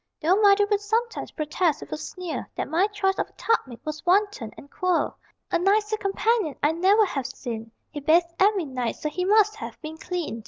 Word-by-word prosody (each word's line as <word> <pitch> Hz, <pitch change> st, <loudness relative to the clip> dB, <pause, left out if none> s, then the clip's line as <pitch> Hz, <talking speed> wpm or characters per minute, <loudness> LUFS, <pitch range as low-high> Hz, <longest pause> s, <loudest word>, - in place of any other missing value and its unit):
Though 340 Hz, +4 st, +3 dB
mother 405 Hz, 0 st, +6 dB
would 410 Hz, 0 st, +2 dB
sometimes 450 Hz, +3 st, -1 dB
protest 305 Hz, 0 st, -1 dB
with -, -, -10 dB
a -, -, -2 dB
sneer 360 Hz, +2 st, -6 dB
That -, -, -3 dB
my 355 Hz, +5 st, +2 dB
choice 410 Hz, -2 st, -1 dB
of -, -, -1 dB
a -, -, -29 dB
tub 455 Hz, 0 st, +2 dB
mate 240 Hz, -3 st, -11 dB
was 305 Hz, 0 st, -5 dB
wanton 375 Hz, -, +1 dB
and 280 Hz, -, -12 dB
queer, 365 Hz, -2 st, 0 dB, 0.4 s
A -, -, +2 dB
nicer 420 Hz, +4 st, +2 dB
companion 410 Hz, -, 0 dB
I 295 Hz, -, +4 dB
never 385 Hz, +6 st, +4 dB
have 275 Hz, -8 st, -3 dB
seen: 230 Hz, -4 st, -6 dB, 0.2 s
He 295 Hz, -, -5 dB
bathed 335 Hz, +4 st, +3 dB
every 390 Hz, -3 st, +3 dB
night, 255 Hz, -4 st, -3 dB
so 305 Hz, -, -3 dB
he 360 Hz, +4 st, -2 dB
must 425 Hz, +1 st, +4 dB
have -, -, -8 dB
been 315 Hz, +1 st, -7 dB
clean. 340 Hz, -, -4 dB
360 Hz, 205 wpm, -25 LUFS, 305-410 Hz, 0.4 s, mother